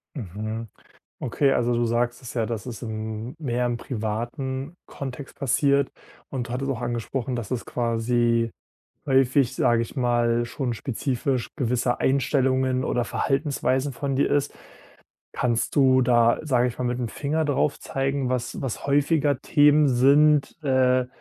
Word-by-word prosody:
Mhm. 110 - -5 0.5
Okay, 140 -2 +1
also 120 0 +1
du 120 0 +1
sagst 120 +2 0
es 125 - -8
ja, 115 -3 0
dass 115 +1 -4
es- 120 -1 -7
hm- 110 +2 -5
mehr 125 -4 -1
im 120 -1 -1
privaten 130 +6 -4
Kontext 135 0 -7
passiert. 140 +1 +2 0.4
Und 125 -3 -4
du - - -5
hattest 135 +2 -2
auch 125 -2 -4
angesprochen, 120 +2 -3
dass 120 -2 -5
es 125 -2 -2
quasi 115 0 +1 0.5
häufig, 135 -1 +3
sag 120 -1 +3
ich 115 +4 -4
mal, 120 -2 +1
schon 120 +1 -3
spezifisch 130 +1 -2
gewisse 125 -2 0
Einstellungen 130 -1 +1
oder 120 - 0
Verhaltensweisen 135 0 0
von 135 +1 -2
dir 140 - +2
ist. 145 0 +1 0.8
Kannst 120 -2 -1
du 130 -2 +5
da, 120 -2 +4
sag 125 -5 +2
ich 125 - -5
mal, 125 - -2
mit'm 125 -1 -2
Finger 155 +3 -1
darauf 145 0 0
zeigen, 135 -1 -1
was 125 -1 -2
was 130 +1 -4
häufiger 145 0 +2
Themen 150 0 +4
sind, 140 +5 +4
äh, 130 -2 +3
125 Hz, 145 wpm, -24 LUFS, 120-140 Hz, 0.8 s, du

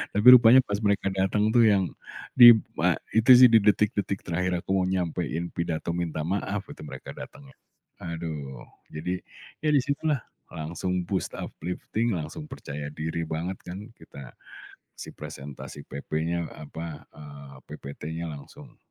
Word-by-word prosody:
Tapi 105 +4 +2
rupanya 125 +1 +8
pas 100 0 -2
mereka 100 -1 +1
datang 95 +3 +1
tuh, 120 - +7
yang 95 -5 +2 0.4
di 120 -2 +11
b 110 - -8 0.4
itu 115 +4 +5
sih, 125 0 +9
di 115 - +7
detik-detik 100 -1 +1
terakhir 90 +1 -1
aku - - -5
mau 90 - +1
nyampein 85 -2 -2
pidato 85 -1 -2
minta 85 -3 -3
maaf 100 +1 -2
itu, - - -12
mereka 65 -2 -9
datengnya. 140 -2 -12 0.5
Aduh, 80 -6 -6 0.3
jadi 90 +4 -3 0.4
ya 155 - +2
di 140 - +4
situlah 140 -1 -1 0.3
langsung 85 +3 -3
boost, 95 -1 -2
uplifting, 105 +6 -3
langsung 85 - -6
percaya 75 - -7
diri 80 +2 -3
banget 85 +4 -4
kan 90 +2 -7 0.2
kita. 70 -3 -12 0.7
Si - - -9
presentasi 70 +1 -9
PP-nya, 80 +4 -3
apa, 80 +1 -8
eee, 70 -2 -12
PPT-nya, 80 +4 -7
langsung 70 -2 -12
90 Hz, 140 wpm, -26 LUFS, 80-105 Hz, 0.7 s, di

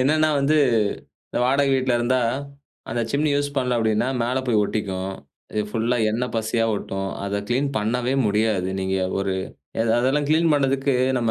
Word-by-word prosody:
என்னன்னா 155 +4 +3
வந்து, 150 +3 +3 0.7
இந்த - - -2
வாடக 140 +1 +2
வீட்ல 130 -1 +1
இருந்தா, 125 +2 +1 0.7
அந்த 120 - -1
சிம்னி 145 +1 +1
யூஸ் 145 0 -2
பண்ணல 125 -2 +1
அப்டீன்னா 110 +2 +1
மேல 125 +3 0
போயி 115 -3 +3
ஒட்டிக்கும். 95 -3 -3 0.4
இது 105 - +1
ஃபுல்லா 115 +3 0
எண்ணெய் 120 +2 -2
பசையா 115 +1 0
ஒட்டும். 95 -1 -4 0.2
அத 100 0 -2
க்ளீன் 130 +4 +1
பண்ணவே 125 +4 0
முடியாது. 105 -3 +1
நீங்க 95 0 -1 0.2
ஒரு 95 -1 -1 0.5
எ - - +4 0.2
அதெல்லாம் 135 +4 +1
க்ளீன் 160 +1 +3
பண்றதுக்கு 135 -1 +1 0.2
நம்ம 115 -2 0
120 Hz, 160 wpm, -23 LUFS, 105-135 Hz, 0.7 s, எ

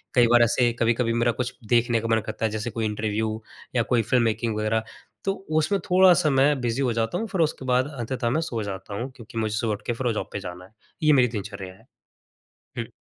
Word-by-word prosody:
कई 120 -1 +6
बार 120 0 +5
ऐसे 120 +1 +3
कभी-कभी 115 0 +2
मेरा 120 0 +2
कुछ 125 +1 -3 0.2
देखने 120 -1 +3
का 115 - -3
मन - - +2
करता 110 0 -3
है, 110 - 0
जैसे 110 +2 -3
कोई 115 -1 -2
इंटरव्यू 110 +1 -2 0.3
या 120 - +3
कोई 120 - +4
फ़िल्म 120 +2 +2
मेकिंग 110 0 0
वग़ैरह 110 +1 0 0.4
तो 195 - +1 0.3
उसमें 195 +6 +1
थोड़ा-सा 180 -3 +6
मैं 135 +1 +3
बिजी 120 +3 -1
हो 125 -3 +1
जाता 115 0 -1
हूँ 225 - -3
फिर 190 -4 -1
उसके 150 -4 -1
बाद 130 +2 +2
अंततः 120 0 -2
मैं 155 +6 +1
सो 115 -8 -3
जाता 100 0 -6
हूँ, 125 +5 -4
क्योंकि 115 -2 -11
मुझे 110 -1 -1
सुबह 110 -1 0
उठ 105 - -6
के 120 - +1
फिर 125 +1 -2
वो 115 - +1
जॉब - - -4
पे 100 - -2
जाना 90 -1 -8
है। 95 - -20 0.3
ये 155 -1 +6
मेरी 125 -2 +5
दिनचर्या 100 -4 -6
है। 95 - -21 0.9
हुँ। - - -4
115 Hz, 235 wpm, -25 LUFS, 110-130 Hz, 0.9 s, कई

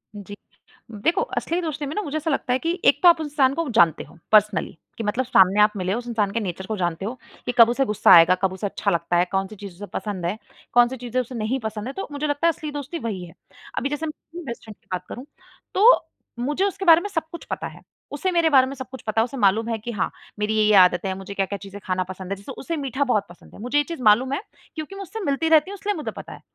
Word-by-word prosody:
जी, 205 0 -9 0.6
देखो 215 +10 0 0.2
असली 340 +2 -1
दोस्ती 300 -3 -4
में 285 - -5
ना 420 - 0
मुझे 310 -6 -4
ऐसा 310 +1 -2
लगता 265 -2 0
है 255 - +1
कि 340 +3 -2
एक - - +5
तो 350 - +10
आप 335 -2 +4
उस 310 - -3
इंसान 275 -3 +3
को 330 +1 -2
जानते 165 -2 +4
हो - - -17
पर्सनली 210 -5 +3 0.2
कि 225 - -4
मतलब 235 +5 -1
सामने 195 -3 +5
आप 210 0 +5
मिले 185 0 -1
उस 240 +2 -4
इंसान 215 -4 0
के 230 - -1
नेचर 190 -3 -5
को 215 - -3
जानते 175 0 -2
हो 225 - -3 0.3
कि - - 0
कब 230 - +9
उसे 265 +3 +1
गुस्सा 210 -3 +3
आएगा 170 +2 +7
कब 190 -1 +2
उसे 190 +2 -3
अच्छा - - -1
लगता 175 +1 0
है, 175 - +3
कौन-सी 195 +2 -2
चीज़ 200 -2 -9
उसे 205 +3 -8
पसंद 200 -5 -4
है, 190 +5 -1 0.4
कौन-सी 245 +2 +4
चीज़ों 250 +1 -2
से 245 +1 -10
नहीं 230 +4 -1
पसंद 220 0 -5
है 265 - -5
तो 390 - -5
मुझे 290 +1 -2
लगता 290 +3 +1
है, - - +5
असली 305 -1 -7
दोस्ती 290 +3 -5
वही 200 -6 -4
है। 165 - -14 0.4
अभी 275 - 0
जैसे 295 +2 -3
मैं 305 - -3 0.2
अपनी 340 +2 -8
बेस्ट 235 -3 -7
फ़्रेंड 215 -1 -10
की - - -37
बात 180 0 -3
करूँ 250 - -7 0.5
तो 445 +6 +5 0.3
मुझे 295 +10 0
उसके 390 -1 -3
बारे 330 0 +7
में 410 - -5
सब 325 -5 -1
कुछ 340 - -8
पता - - -3
है। - - -13 0.3
उसे 330 +6 -1
मेरे 335 -2 +3
बारे 260 -3 +5
में 275 - -5
सब 260 -1 -8
कुछ 260 - -9
पता 220 +1 +2
है - - +2
उसे 255 +2 -8
मालूम 215 +2 +2
है 225 - -1
कि 235 +3 -6
हाँ 210 - -1 0.3
मेरी 210 +1 0
ये-ये 215 -1 +4
आदतें 180 0 +5
हैं। 190 - -2
मुझे 195 +1 -8
क्या-क्या 200 0 -2
चीज़ें 200 0 -10
खाना 185 -1 0
पसंद 190 0 -7
है 200 - 0
जैसे 200 - -10
उसे 330 +5 -4
मीठा 275 -1 -1
बहुत 230 -7 0
पसंद 175 - -16
है। - - -13
मुझे 250 +5 -1
ये 290 - +4
चीज़ 335 -2 -7
मालूम 245 +5 +4
है 370 - -2 0.3
क्योंकि 315 +4 -6
मैं 395 - -7
उससे 420 +4 -7
मिलती 290 +3 0
रहती 315 +4 +4
हूँ 405 - -7
इसलिए 415 0 0
मुझे 305 - -4
पता - - -9
है। - - -13
240 Hz, 280 wpm, -23 LUFS, 200-295 Hz, 0.6 s, तो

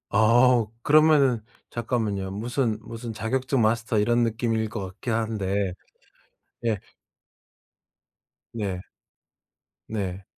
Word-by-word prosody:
아. 120 +2 +5 0.2
그러면은 145 -4 +5 0.3
잠깐만요. 110 -5 -2
무슨 115 +2 -1
무슨 115 +1 -7
자격증 130 +4 0
마스터 110 +1 +1
이런 120 +3 +3
느낌일 115 -1 0
것 100 -3 -4
같긴 100 +5 -4
한데 100 -4 -1 0.9
예. 110 -2 +2 1.8
네. 100 -5 -3 1.1
네. 95 -3 -3
115 Hz, 185 characters per minute, -25 LUFS, 105-120 Hz, 1.8 s, 아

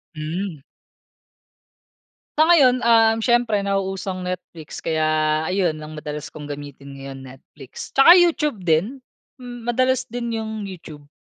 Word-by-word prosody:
Mhm. 160 +1 -5 1.8
Sa 310 - +5
ngayon, 285 -7 +5
um, 225 -1 +5
siyempre 240 -3 +2
nauuso 195 -1 -2
ang 185 - -7
Netflix 170 -3 -7
kaya 155 -1 +1
ayun 180 -5 0
ang 155 0 -9
madalas 150 0 -6
kong 150 - -10
gamitin 140 -1 -9
ngayon, 135 0 -8
Netflix, 135 +1 -12
tsaka 275 +6 +9
YouTube 300 - +1
din. 180 - 0 0.4
Hmm, 245 -2 -9
madalas 255 +1 +1
din 235 -1 -3
yung 220 -2 -5
YouTube. 155 -6 -11
190 Hz, 130 wpm, -21 LUFS, 155-240 Hz, 1.8 s, tsaka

